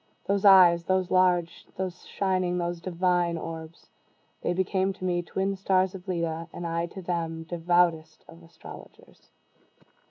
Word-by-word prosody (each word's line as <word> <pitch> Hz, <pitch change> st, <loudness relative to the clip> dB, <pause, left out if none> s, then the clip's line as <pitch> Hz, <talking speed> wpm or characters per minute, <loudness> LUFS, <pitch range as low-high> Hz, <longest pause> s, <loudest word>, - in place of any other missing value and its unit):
Those 200 Hz, +1 st, 0 dB
eyes! 175 Hz, -3 st, +7 dB
those 185 Hz, -1 st, 0 dB
large, 180 Hz, -2 st, +1 dB
those 185 Hz, -1 st, -5 dB
shining, 185 Hz, -2 st, -1 dB
those 175 Hz, -1 st, -3 dB
divine 175 Hz, -1 st, 0 dB
orbs! 160 Hz, 0 st, -8 dB, 0.5 s
they -, -, -1 dB
became 190 Hz, +1 st, 0 dB
to 185 Hz, -, -8 dB
me 175 Hz, -1 st, 0 dB
twin 190 Hz, +3 st, -2 dB
stars 190 Hz, -1 st, +1 dB
of 190 Hz, 0 st, -10 dB
Leda, 165 Hz, -2 st, -3 dB
and 175 Hz, -, -7 dB
I 170 Hz, 0 st, -2 dB
to 190 Hz, +2 st, -10 dB
them 165 Hz, -2 st, -3 dB
devoutest 165 Hz, -1 st, 0 dB
of 165 Hz, +1 st, -15 dB
astrologers. 165 Hz, 0 st, -15 dB
175 Hz, 145 wpm, -27 LUFS, 170-185 Hz, 0.5 s, eyes